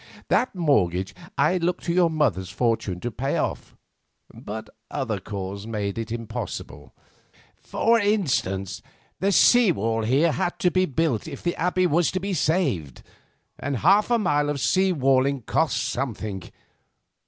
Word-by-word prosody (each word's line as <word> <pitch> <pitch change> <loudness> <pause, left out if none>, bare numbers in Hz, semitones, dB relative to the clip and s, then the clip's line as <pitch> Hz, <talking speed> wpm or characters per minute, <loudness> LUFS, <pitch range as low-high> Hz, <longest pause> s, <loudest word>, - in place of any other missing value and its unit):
That 250 - +1
mortgage 95 - +1 0.2
I 155 +6 +3
looked 175 +1 -1
to 170 - -1
your 175 -1 +4
mother's 115 - 0
fortune 115 -7 -1
to 120 - -3
pay 135 +5 -2
off, - - -3 0.6
but 110 +1 -7 0.2
other 120 -8 -2
calls 100 +1 -6
made 105 -3 -2
this 115 +1 -5
impossible. 115 - -6 0.6
For 230 +1 +1
instance, 145 - 0 0.4
the 195 +1 +1
sea 240 +1 +6
wall 115 -4 -1
here 135 +9 +2
had 175 - -2
to 180 - +2
be 185 +1 +2
built 140 -5 -1
if - - -8
the 175 - -1
Abbey 180 +2 +1
was 170 0 +2
to 185 - 0
be 195 +1 -3
saved, 145 - -1 0.6
and 140 -2 -2
half 205 - +4
a 240 - +4
mile 145 -8 +1
of 145 -1 -2
sea 185 +11 +2
walling 135 -3 +2
costs 160 +6 +1
something. 110 -7 -3
140 Hz, 150 wpm, -24 LUFS, 110-175 Hz, 0.6 s, sea